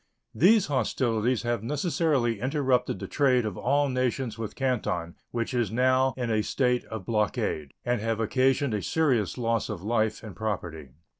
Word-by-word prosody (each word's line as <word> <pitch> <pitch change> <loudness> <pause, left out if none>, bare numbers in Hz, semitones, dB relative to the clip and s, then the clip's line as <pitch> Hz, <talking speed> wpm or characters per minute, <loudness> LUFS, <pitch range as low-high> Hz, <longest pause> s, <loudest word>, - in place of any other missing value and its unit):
These 200 +4 +5
hostilities 125 - 0
have 120 -2 -1
necessarily 140 - 0
interrupted 130 -1 +1
the - - -6
trade 130 -5 +2
of 105 -4 -3
all 140 +6 +1
nations 130 -2 -1
with 115 -1 -6
Canton, 110 -10 -1
which 115 +1 -3
is 120 -5 +1
now 130 +2 +2
in 120 -2 -2
a 110 -1 +2
state 125 +2 0
of 110 -5 -7
blockade, 100 -9 -1
and 120 -3 0
have 115 0 -1
occasioned 130 +3 +2
a 105 - -1
serious 130 - +1
loss 115 -2 0
of 100 -4 -5
life 110 0 0
and 105 -4 -9
property. 85 -9 -4
120 Hz, 160 wpm, -27 LUFS, 110-130 Hz, -, These